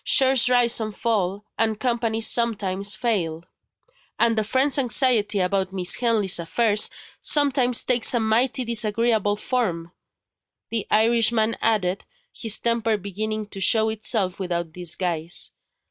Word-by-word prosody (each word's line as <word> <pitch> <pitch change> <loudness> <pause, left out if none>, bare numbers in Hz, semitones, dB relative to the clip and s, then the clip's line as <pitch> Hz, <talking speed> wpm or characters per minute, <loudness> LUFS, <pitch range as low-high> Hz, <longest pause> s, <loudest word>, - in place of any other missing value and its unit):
Shares 265 -2 +4
rise 245 -2 +3
and 215 -2 -5
fall 205 -3 -2
and 220 -1 0
Companies 230 -3 -1
some 235 0 +2
times 200 +1 -2
fail." 175 -9 -2 0.7
"And 230 -1 +2
a - - 0
friend's 265 +6 +1
anxiety 240 -5 +2
about 190 +1 -1
Miss 180 -2 0
Henley's 220 -7 +1
affairs 210 +5 +1 0.3
sometimes 270 -5 +2
takes 245 -1 +2
a - - +2
mighty 240 +4 0
disagreeable 225 -2 +1
form," 190 -8 -3 0.8
the 225 -3 -3
Irishman 230 0 +2
added, 200 -4 0 0.3
his 225 -2 -1
temper 230 -2 0
beginning 215 +2 -5
to 195 - -8
show 220 +3 +3
itself 210 -3 -1
without 170 -3 -4
disguise. 175 -1 -3
220 Hz, 130 wpm, -23 LUFS, 195-235 Hz, 0.8 s, Shares